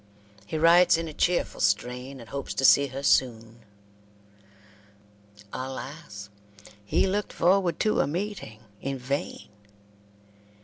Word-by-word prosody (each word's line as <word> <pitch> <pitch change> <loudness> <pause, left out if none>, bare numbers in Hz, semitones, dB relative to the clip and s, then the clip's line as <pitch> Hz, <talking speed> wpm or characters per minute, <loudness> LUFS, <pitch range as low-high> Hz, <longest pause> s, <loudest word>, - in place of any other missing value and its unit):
He 155 - -3
writes 170 +2 +5
in 165 0 -4
a 155 - -7
cheerful 175 +3 0
strain, 125 +6 -1
and 115 - -12
hopes 140 -1 -5
to 135 - +1
see 140 +1 +6
her 135 +1 -7
soon. 115 -4 +1 1.9
Alas! 130 -5 -7 0.5
he 100 - +1
looked 205 +2 -2
forward 180 -1 +2
to 215 - +1
a - - 0
meeting 170 - -5 0.2
in 135 0 -3
vain. 135 +3 -4
140 Hz, 120 wpm, -26 LUFS, 125-170 Hz, 1.9 s, see